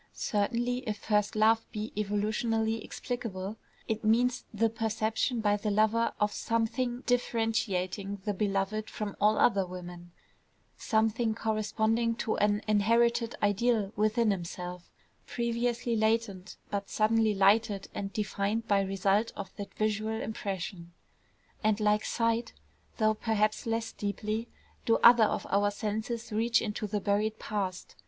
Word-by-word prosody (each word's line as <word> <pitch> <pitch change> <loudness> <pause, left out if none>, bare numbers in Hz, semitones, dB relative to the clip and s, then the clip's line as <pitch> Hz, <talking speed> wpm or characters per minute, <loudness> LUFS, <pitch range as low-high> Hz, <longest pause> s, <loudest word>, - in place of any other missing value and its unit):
Certainly 240 +4 0
if 210 -1 -2
first 210 0 0
love 220 +1 +3
be 215 0 -5
evolutionally 220 +2 0
explicable, 215 -4 -5 0.3
it 220 -1 -2
means 245 +3 +2
the 225 - +2
perception 225 +2 -1
by 205 -1 +2
the 210 +1 -2
lover 220 +3 +2
of 210 0 +2
some 230 0 0
thing 245 +1 -2
differentiating 205 -5 -1
the 205 - 0
beloved 200 +2 -1
from 210 -2 -5
all 215 +1 +4
other 200 -4 +4
women, 175 -1 -9 0.6
something 220 +1 +1
corresponding 220 +1 0
to 225 -1 -1
an 210 +1 +2
inherited 230 +3 +2
ideal 205 0 +2
within 215 +1 +2
himself, 180 -1 -5 0.4
previously 235 0 -1
latent, 220 -3 0
but 200 -1 -3
suddenly 220 0 +2
lighted 200 0 +3
and 195 -1 -4
defined 210 +1 -2
by 200 -1 +3
result 195 +3 +1
of 195 -2 -7
that 200 - -6
visual 215 +1 -1
impression. 190 -5 -5 0.7
And 215 0 +2
like 210 0 +2
sight, 230 0 0 0.4
though 215 -2 +3
perhaps 215 0 0
less 225 0 -1
deeply, 215 +3 -3 0.4
do 225 - +3
other 235 -2 +8
of - - -2
our 205 +1 +3
senses 220 +3 -4
reach 230 +2 +2
into 210 0 -3
the 205 0 -2
buried 210 +2 0
past. 195 -5 -4
215 Hz, 130 wpm, -30 LUFS, 205-225 Hz, 0.7 s, other